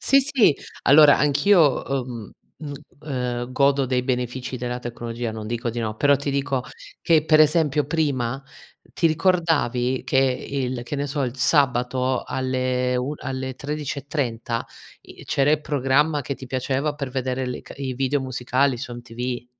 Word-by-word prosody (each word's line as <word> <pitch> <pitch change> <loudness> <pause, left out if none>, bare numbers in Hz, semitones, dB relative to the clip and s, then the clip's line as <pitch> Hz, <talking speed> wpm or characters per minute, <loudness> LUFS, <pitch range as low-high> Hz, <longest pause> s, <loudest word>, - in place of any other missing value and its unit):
Sì, 275 - +4
sì, 265 - +3 0.3
allora 145 +1 +7
anch'io, 150 +1 +4
uhm, 125 -5 -4 0.3
uhm, 145 -2 -6 0.3
ehm, 125 -3 -3
godo 140 0 +3
dei 125 0 0
benefici 125 0 -3
della 125 0 -3
tecnologia, 120 -1 -5
non 110 -1 -6
dico 120 +2 -2
di 120 - -6
no, 110 -2 -3
però 145 +4 +4
ti 140 +1 -3
dico, 140 -1 -1 0.4
che 160 -2 +3
per 155 -1 +5
esempio 150 -1 +3
prima 140 -5 -1 0.5
ti 170 - +2
ricordavi 155 -7 +1
che - - 0
il 130 -1 -1
che 135 +4 -5
ne 140 +1 -2
so, 145 0 -2
il 125 -1 -3
sabato 130 -2 +1
alle 130 -1 -1
un 130 +4 -2
alle 130 -1 -4
13.30 140 -5 -3 0.4
i - - -14
c'era 140 +2 +2
i 155 - +2
programma 145 +1 +1
che 140 0 -4
ti 130 - -10
piaceva 135 +3 -1
per 140 -3 -5
vedere 130 0 -2
le 125 - -5
ca - - -11
i 135 -2 -4
video 135 +2 0
musicali, 130 +1 0
su 125 0 -6
MTV, 120 +1 -5
130 Hz, 160 wpm, -23 LUFS, 125-145 Hz, 0.5 s, allora